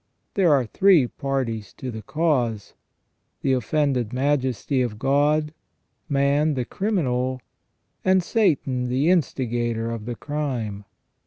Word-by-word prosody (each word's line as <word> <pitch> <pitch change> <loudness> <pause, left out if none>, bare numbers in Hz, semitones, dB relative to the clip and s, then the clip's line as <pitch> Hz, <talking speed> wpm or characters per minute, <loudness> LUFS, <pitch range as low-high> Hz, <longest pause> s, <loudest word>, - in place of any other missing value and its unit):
There 185 -5 +3
are 135 -4 +3
three 175 - +4
parties 120 -6 -3
to 130 - -6
the 110 -1 -7
cause 125 -6 -1 0.3
— - - -49
the 135 - +2
offended 130 -2 0
Majesty 130 -1 0
of 120 -4 -2
God; 145 +4 +2 0.6
man, 145 +2 +2
the 125 -2 -1
criminal; 130 - -1 0.6
and 185 -1 +3
Satan, 140 - +1
the 135 +7 +2
instigator 120 -8 0
of 115 -2 -5
the 120 0 -4
crime. 120 -9 -4
130 Hz, 120 wpm, -24 LUFS, 120-150 Hz, 0.6 s, three